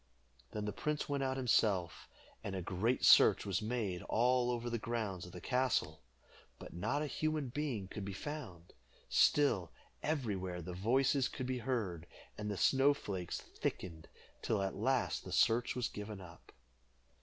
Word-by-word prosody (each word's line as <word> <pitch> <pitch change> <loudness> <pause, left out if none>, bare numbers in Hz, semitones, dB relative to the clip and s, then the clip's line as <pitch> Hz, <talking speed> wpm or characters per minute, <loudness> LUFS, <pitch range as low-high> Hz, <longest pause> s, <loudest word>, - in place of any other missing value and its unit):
Then 105 -1 -3
the 105 - -2
prince 150 +5 -2
went 140 -1 -1
out 130 0 0
himself, 105 -8 +1 0.3
and 100 - -4
a 95 - -2
great 105 +8 0
search - - +7
was 100 -1 0
made 105 -5 -2
all 125 +1 +3
over 120 -1 -2
the 120 -1 -1
grounds 110 -6 -3
of - - -11
the 90 - -8
castle, 125 - 0 0.6
but - - -10
not 110 - -1
a - - -1
human 155 -1 -1
being 125 -7 -3
could 100 +1 -6
be 100 - -4
found. 95 - -7 0.4
Still, 115 - +3 0.3
everywhere 100 - -2
the 90 +2 -6
voices 130 +7 +2
could 130 - -5
be 130 0 -2
heard, 105 -10 -2 0.3
and 105 0 -4
the 100 - -2
snow 135 +6 +4
flakes 95 -9 -4
thickened, 80 -3 -5 0.3
till 105 -3 0
at 95 - -2
last 125 +4 0
the - - -8
search 115 +2 +3
was 125 -2 0
given 105 -1 -7
up. 85 -2 -13
110 Hz, 165 wpm, -35 LUFS, 95-130 Hz, 0.6 s, search